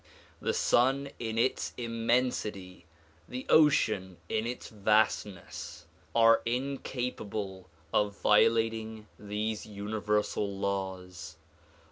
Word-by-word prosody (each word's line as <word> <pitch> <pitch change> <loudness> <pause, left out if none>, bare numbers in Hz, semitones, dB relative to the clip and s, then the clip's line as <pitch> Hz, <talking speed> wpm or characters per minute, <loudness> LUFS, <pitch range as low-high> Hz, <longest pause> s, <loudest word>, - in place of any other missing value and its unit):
The - - -1
sun 135 +3 +2
in 110 -1 -3
its 120 +3 0
immensity, 115 -6 -1 0.4
the 125 +1 -5
ocean 105 - +4
in 110 +1 0
its 125 - -5
vastness 105 -2 0 0.3
are 115 0 +6
incapable 120 -6 -3 0.2
of 105 -1 +1
violating 110 0 +2
these 105 +1 -3
universal 105 -1 -1
laws. 95 -4 -4
110 Hz, 85 wpm, -30 LUFS, 100-115 Hz, 0.4 s, are